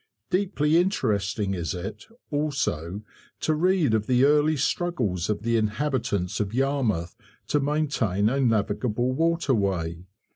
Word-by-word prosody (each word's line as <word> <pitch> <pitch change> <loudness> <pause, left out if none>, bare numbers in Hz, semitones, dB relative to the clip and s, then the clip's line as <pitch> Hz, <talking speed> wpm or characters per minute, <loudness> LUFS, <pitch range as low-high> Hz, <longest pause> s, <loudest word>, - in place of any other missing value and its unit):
Deeply 180 -5 +2
interesting 105 - 0
is 85 0 -3
it, 90 +2 -7 0.2
also, 120 - -2 0.4
to 155 - +1
read 170 -4 +2
of 110 -1 +1
the 125 +1 +4
early 150 +1 +3
struggles 125 - -1
of 105 0 -1
the 115 0 +1
inhabitants 105 -4 -1
of 105 +1 -2
Yarmouth 125 -11 0 0.3
to 150 - +2
maintain 135 -9 0
a 135 +5 +1
navigable 115 +1 +1
waterway. 100 - 0
120 Hz, 120 wpm, -25 LUFS, 100-150 Hz, 0.4 s, the